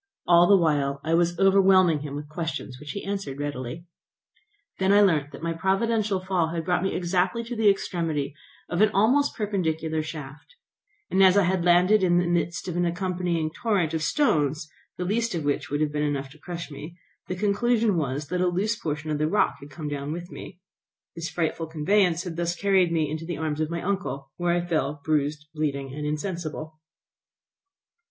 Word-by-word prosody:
All 175 0 +6
the 200 - +7
while 145 -5 +1
I 160 - 0
was 170 0 +2
overwhelming 190 -4 +5
him 145 -1 -6
with 145 +1 -6
questions 155 -4 -5
which 150 - -11
he 200 - -5
answered 195 -9 -4
readily. 145 +2 -5 0.9
I 190 - +1
then 205 +1 +6
learnt 150 -6 +1
that - - -10
my 170 0 -1
providential 200 +3 +1
fall 185 -3 0
had 165 0 -4
brought 180 0 +1
me 190 - -1
exactly 180 +6 0
to 240 +1 -6
the 220 -2 +4
extremity 165 -7 -1 0.3
of 175 +2 -1
an 215 - +6
almost 255 +8 +3
perpendicular 160 -7 -1
shaft; 150 - -9 0.6
and 190 - +3
as 190 0 +6
I 200 - +5
had 180 0 +1
landed 180 +4 +5
in 175 -2 +3
the 175 - +2
midst 175 0 -1
of 175 - -3
an 175 - +1
accompanying 175 -2 -1
torrent 185 -4 0
of 160 - -1
stones, 155 - +1 0.3
the 180 - -3
least 225 +2 0
of 165 - -2
which 145 - -1
would 145 +1 -1
have 150 -1 +1
been 150 0 -2
enough 140 -2 -2
to 155 - -16
crush 170 -1 -7
me, 150 +5 -9 0.3
the 185 - -3
conclusion 215 +2 +2
was 145 -2 -2
that 180 +1 -1
a 185 - +3
loose 195 +6 0
portion 155 -4 -4
of 150 - -1
the 155 - +2
rock 210 - +2
had 140 - -11
come 150 +2 -7
down 145 0 -4
with 175 +2 -6
me. - - -10 0.6
This 165 0 -4
frightful 165 -1 -2
conveyance 175 +2 +2
had 175 -3 -6
thus 170 0 -1
carried 190 -2 +2
me 160 -2 +1
into 155 +2 -5
the 175 - -3
arms 155 -1 -2
of 155 - -1
my 170 0 -4
uncle, 185 -8 -3
where 175 0 +1
I 175 0 0
fell 150 -4 -1
bruised, 150 -1 0
bleeding, 140 -3 -2
and 150 +1 -4
insensible. 155 -1 -4
170 Hz, 195 wpm, -25 LUFS, 150-190 Hz, 0.9 s, the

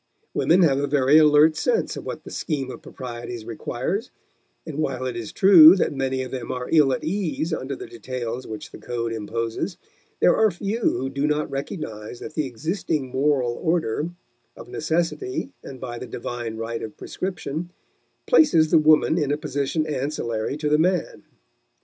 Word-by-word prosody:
Women 180 +3 +4
have 140 -4 +3
a 145 - 0
very 140 +1 +5
alert 150 +1 +6
sense 460 - 0
of - - -7
what - - -5
the - - -10
scheme 135 -5 -3
of - - -10
proprieties 120 -2 -7
requires, 130 - -3 0.6
and 155 -2 -6
while 130 -4 -1
it 125 -2 -3
is 115 -3 -5
true 180 -3 +9
that 185 - 0
many 130 -1 -1
of 130 - -8
them 125 -3 -4
are 125 0 -4
ill 150 -4 +5
at - - -2
ease 170 -2 -2
under 140 -2 -3
the - - -8
details 120 0 -5
which 110 -1 -7
the - - -11
code 115 -1 -3
imposes, 115 - -3 0.4
there - - +5
are 220 -1 +4
few 200 +5 -3
who 130 - 0
do 140 +2 -1
not 150 -1 -1
recognize 120 - -5
that 155 - -8
the 155 -3 -1
existing 155 - -2
moral 135 -3 +1
order, 160 0 -1 0.5
of - - -10
necessity 175 - -2
and 130 -2 -9
by 120 -2 -6
the 125 - -7
divine 120 -1 -5
right 115 +1 -4
of 110 - -7
prescription, 175 -3 -4 0.6
places 170 - +5
the - - +7
woman 155 +2 +4
in 145 -2 0
a 145 - +1
position 150 +1 -1
ancillary 135 -4 -2
to 150 0 -2
the 150 +1 +3
man. 180 +2 0
140 Hz, 175 wpm, -24 LUFS, 125-160 Hz, 0.6 s, true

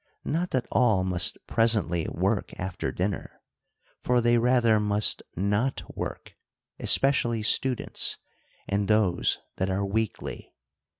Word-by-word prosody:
Not 170 +4 -1
that 130 -2 -1
all 110 -6 +3
must 90 -2 +2
pres 115 0 +2
ently 85 -5 -2
work - - -2
after 95 -1 -3
dinner. 95 +1 -4 0.6
For 125 0 +2
they 120 0 +3
rather 115 -2 +3
must 105 0 0
not 105 +8 -1
work, - - -6 0.5
especially 120 -5 +3
students, 125 +3 +1 0.5
and 100 0 -1
those 105 -5 +2 0.2
that 95 - -1
are 95 +1 -1
weakly. 110 +1 -4
110 Hz, 120 wpm, -26 LUFS, 95-120 Hz, 0.6 s, all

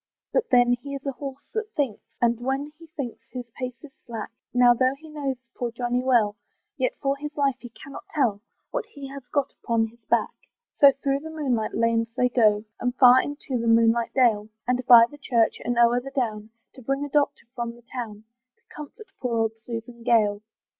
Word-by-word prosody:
But - - +1
then 245 -1 +5
he 280 +1 -6
is 275 - -8
a 275 - 0
horse 275 +1 -8
that 440 0 -3
thinks! 270 -8 -1 0.2
And 235 -1 +2
when 270 +4 -2
he 330 - -13
thinks 280 -6 -6
his 250 -1 -6
pace 250 0 -6
is 295 - -11
slack; 230 -2 -6 0.2
Now, 245 -1 +6
though 255 +2 +2
he 315 +1 -13
knows 280 -3 -2 0.2
poor 245 - -2
Johnny 245 +1 -1
well, 230 -5 +2 0.4
Yet - - -1
for 275 0 +2
his 295 +1 -7
life 275 -2 +2
he 245 - -10
cannot 275 +4 -11
tell 230 -9 +1 0.3
What - - -3
he 280 -1 -9
has 275 0 -8
got 285 -2 -1
upon 230 -1 +2
his 235 0 -24
back. - - +1 0.4
So 280 -1 +7
through 275 0 -1
the 320 +2 -8
moonlight 260 -9 -1
lanes 230 0 +1
they 250 - +3
go, 215 -4 +3
And 245 0 -1
far 255 0 +7
into 285 -3 -4
the 230 - -2
moonlight 230 0 +3
dale, 220 -5 +3 0.2
And 250 0 +1
by 235 -2 +10
the 290 +5 -14
church, 235 -5 +1
and 240 +1 -1
o'er 240 +1 +4
the 270 - -7
down, 220 -6 -2 0.2
To 260 - -13
bring 275 +4 -1
a - - -7
doctor 290 0 +1
from 235 -1 -4
the 240 - -18
town, 220 -4 -6 0.3
To - - -21
comfort 305 - -10
poor 240 -2 -1
old 225 -1 +1
Susan 235 +1 -7
Gale. 215 -4 +3
250 Hz, 205 wpm, -25 LUFS, 230-275 Hz, 0.4 s, by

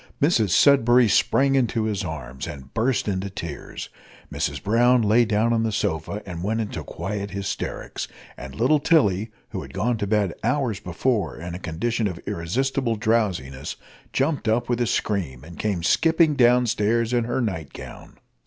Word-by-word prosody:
Mrs 125 - +3
Sudberry 125 - +5
sprang 115 +6 +3
into 120 -4 +1
his 105 -3 -1
arms, 65 -5 -6
and 70 -5 -9
burst 115 +1 0
into 95 0 -2
tears; 85 -6 -7 0.4
Mrs - - -2
Brown 120 +3 +4
lay 110 +3 +4
down 110 +2 +2
on 115 - +2
the 115 -1 0
sofa, 100 -1 -2
and 90 -3 -6
went 110 +3 0
into 100 -8 -4
quiet 100 +7 -4
hysterics; 100 0 -4 0.3
and 65 0 -9
little 130 +7 +3
Tilly, 115 - +2 0.2
who - - -5
had - - -11
gone 115 +5 0
to 100 - -1
bed 100 -3 +1
hours 125 -4 0
before 105 +5 -1
in 85 +1 -6
a 90 - -5
condition 110 +7 -1
of 90 -4 -5
irresistible 120 +8 -1
drowsiness, 105 - -1 0.4
jumped 135 -2 0
up 110 +3 +1
with 120 0 0
a 120 - +2
scream, 80 - -1
and 85 +2 -12
came 100 -6 -1
skipping 160 - +3
down 125 -2 +4
stairs 115 +1 +1
in 120 -2 +2
her 120 +2 -1
night 90 - -3
gown. - - -11
110 Hz, 170 wpm, -24 LUFS, 90-120 Hz, 0.4 s, Sudberry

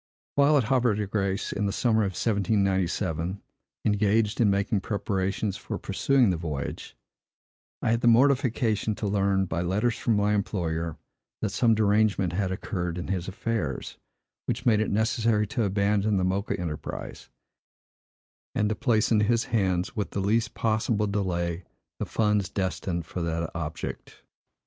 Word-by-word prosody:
While 145 +1 +5
at 135 - +3
Havre 120 -2 +2
de 105 0 -1
Grâce, 100 0 -1
in 100 0 -1
the - - 0
summer 110 +1 +2
of 100 -2 -1
1797, 95 -4 0 0.5
engaged 105 +2 +2
in 110 - +5
making 100 +1 +1
preparations 100 -1 -1
for - - -5
pursuing 130 -7 +2
the 90 - -1
voyage, 75 -4 -5 0.9
I - - +2
had 115 +1 +1
the 120 - +2
mortification 120 -4 +3
to 105 - -4
learn, 100 -1 +2
by 85 -1 -2
letters 105 +7 +1
from 115 - +1
my 105 0 +2
employer, 85 -6 -2 0.5
that 110 - +1
some 115 +1 +3
derangement 105 -4 +2
had 95 0 -1
occurred 90 -3 -3
in 90 - -5
his 90 -2 -2
affairs, 100 - -3 0.5
which - - -2
made 110 -4 +4
it 110 - 0
necessary 110 0 +1
to 110 +2 -1
abandon 100 +1 +1
the 95 - +1
Mocha 95 +2 -1
enterprise, 80 -4 -6 1.3
and 105 - +2
to 110 - 0
place 110 -1 +1
in 110 - +5
his 115 +2 +2
hands, 95 -2 +1
with 105 -3 -2
the - - -3
least 110 +4 +1
possible 110 -1 +1
delay, 90 -4 -1 0.4
the - - -3
funds 105 -3 +1
destined 90 -2 -2
for 90 - -5
that 85 0 -2
object. 80 -2 -6
100 Hz, 155 wpm, -27 LUFS, 95-110 Hz, 1.3 s, While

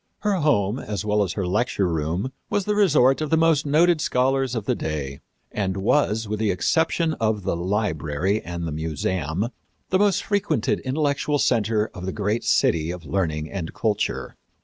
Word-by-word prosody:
" - - -49
Her 205 -2 +1
home, 125 - +1
as 105 -2 -4
well 105 0 +2
as 95 -3 0
her 100 -2 -2
lecture 100 +1 0
room, 85 - -2 0.2
was 205 -2 0
the 210 - +1
resort 150 -10 +4
of 155 - -2
the 160 - +3
most 160 -2 +3
noted 160 +2 +4
scholars 130 -1 +1
of 110 -3 -3
the - - +1
day, 70 -3 -4 0.3
and 95 -2 -2
was, 110 +1 +1
with 105 0 -3
the 110 -2 +1
exception 160 - +1
of 110 -2 0
the - - -1
Library 90 -1 -1
and 85 -1 -5
the - - -4
Museum, 80 +5 -2 0.4
the 185 - +3
most 205 -2 +2
frequented 200 -7 0
intellectual 145 +2 0
center 110 -4 +1
of 90 +1 -7
the - - -1
great 105 +2 -1
city 80 -1 +2
of 85 -1 -6
learning 80 -2 -2
and 85 -5 -5
culture. 105 -3 -1
105 Hz, 180 wpm, -23 LUFS, 90-145 Hz, 0.4 s, resort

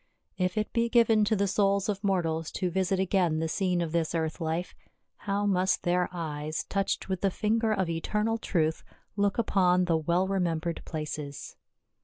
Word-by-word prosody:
If 185 +2 0
it 215 - -1
be 235 0 +1
given 230 -3 +4
to 220 - +2
the 200 0 +1
souls 200 +1 +2
of 205 -1 -2
mortals 165 -5 0
to 180 -1 -1
visit 190 +1 0
again 185 -4 +2
the 160 +1 -1
scene 180 +1 0
of 165 -2 -2
this 170 0 0
earth 160 +1 -2
life, 165 +2 -2 0.4
how 205 0 -2
must 190 -1 +1
their 180 0 +1
eyes, 155 -3 -4
touched 195 -1 -2
with 190 -2 -2
the 195 - +3
finger 220 +3 0
of 190 -4 +1
eternal 210 +7 -1
truth, 160 -6 0 0.3
look 200 -1 +1
upon 185 -5 +3
the 165 -2 +2
well 170 +4 +1
remembered 170 -3 -1
places. 150 -2 -6
185 Hz, 175 wpm, -28 LUFS, 165-200 Hz, 0.4 s, given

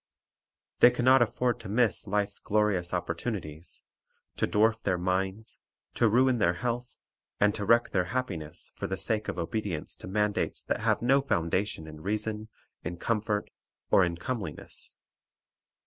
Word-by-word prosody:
They - - +9
can 125 0 -2
not 130 0 +7
afford 120 +1 +1
to - - -8
miss 110 -1 +1
life's 100 0 0
glorious 100 -4 +1
oppor 90 -2 -1
tunities, 85 -6 -5 0.6
to - - +1
dwarf 110 +2 +3
their 90 - +1
minds, 95 +4 -2 0.3
to 115 - +3
ruin 125 +2 +4
their 85 -3 +3
health, 120 +3 -3 0.4
and 105 0 +4
to 105 - -3
wreck 115 +3 +4
their 90 -2 +1
happiness, 90 -8 -4
for - - -4
the 95 - -3
sake 110 +1 0
of - - -3
obedience 90 -2 -3
to - - -8
mandates 105 +2 0
that - - -1
have - - +1
no 135 +3 +4
foundation 90 - 0
in 75 -1 -10
reason, 110 +3 -2 0.4
in 85 +2 -4
comfort, 105 +1 -1 0.4
or 95 - +6
in 85 -1 -1
comeliness. 100 -5 -5
105 Hz, 155 wpm, -29 LUFS, 90-115 Hz, 0.6 s, They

